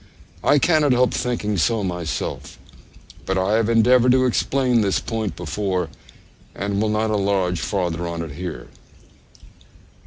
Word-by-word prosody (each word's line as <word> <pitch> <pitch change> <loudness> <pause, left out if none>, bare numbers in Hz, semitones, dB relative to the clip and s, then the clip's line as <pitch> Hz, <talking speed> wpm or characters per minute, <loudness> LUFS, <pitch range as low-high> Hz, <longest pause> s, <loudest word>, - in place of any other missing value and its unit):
I 145 - +4
cannot 150 -2 +3
help 125 0 +2
thinking 105 -4 -2
so 110 +4 +1
myself; 90 -3 -4 0.7
but 95 - 0
I 95 +3 +1
have 115 0 +1
endeavoured 125 +2 +4
to 130 0 +3
explain 125 -1 +1
this 100 -2 +1
point 110 -6 -3
before, 90 +1 -2 0.7
and 100 +1 -2
will 110 - +1
not 110 +1 0
enlarge 95 -4 0
farther 85 -4 -2
on 85 0 -4
it 80 - -7
here. 75 -5 -7
105 Hz, 135 wpm, -21 LUFS, 90-120 Hz, 0.7 s, I